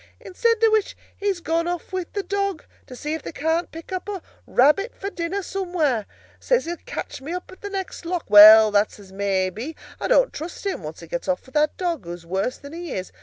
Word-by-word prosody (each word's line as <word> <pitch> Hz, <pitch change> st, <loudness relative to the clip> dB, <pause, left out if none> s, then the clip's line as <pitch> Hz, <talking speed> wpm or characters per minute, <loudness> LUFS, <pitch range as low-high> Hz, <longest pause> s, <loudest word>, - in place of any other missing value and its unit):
Instead 460 Hz, +5 st, +1 dB
of 445 Hz, -, +6 dB
which, 435 Hz, -2 st, +1 dB, 0.2 s
he's 400 Hz, -3 st, -1 dB
gone 335 Hz, +1 st, 0 dB
off 350 Hz, +2 st, -4 dB
with 370 Hz, -2 st, -3 dB
the 400 Hz, -, -2 dB
dog, 395 Hz, -4 st, -2 dB, 0.2 s
to 250 Hz, -, -9 dB
see 300 Hz, +5 st, -4 dB
if 320 Hz, -, -3 dB
they -, -, -7 dB
can't 320 Hz, +2 st, -1 dB
pick 330 Hz, +3 st, -10 dB
up 375 Hz, +2 st, -4 dB
a 390 Hz, -4 st, -5 dB, 0.2 s
rabbit 300 Hz, -, +3 dB
for 395 Hz, +1 st, -5 dB
dinner 360 Hz, +3 st, -3 dB
somewhere. 350 Hz, -, -1 dB, 0.3 s
Says -, -, +1 dB
he'll 345 Hz, +1 st, -4 dB
catch -, -, -5 dB
me 305 Hz, +6 st, -5 dB
up 360 Hz, 0 st, -6 dB
at 375 Hz, -, -14 dB
the 405 Hz, -, -5 dB
next 385 Hz, -2 st, -5 dB
lock. 345 Hz, 0 st, -3 dB
Well, 215 Hz, +1 st, +10 dB
that's 205 Hz, +1 st, +1 dB
as 195 Hz, -2 st, -14 dB
may 195 Hz, -1 st, 0 dB
be—I 250 Hz, -, -7 dB
don't -, -, +4 dB
trust 335 Hz, +5 st, -7 dB
him, 390 Hz, -, -2 dB
once 155 Hz, +1 st, -8 dB
he 170 Hz, -, -10 dB
gets 175 Hz, +3 st, -4 dB
off 185 Hz, -1 st, -1 dB
with 260 Hz, -, -17 dB
that 300 Hz, 0 st, +2 dB
dog, 340 Hz, -, -2 dB
who's 170 Hz, 0 st, -8 dB
worse 190 Hz, +8 st, -2 dB
than 285 Hz, +1 st, -11 dB
he 340 Hz, -2 st, -6 dB
is. 185 Hz, 0 st, -4 dB
330 Hz, 225 wpm, -23 LUFS, -, 0.3 s, Well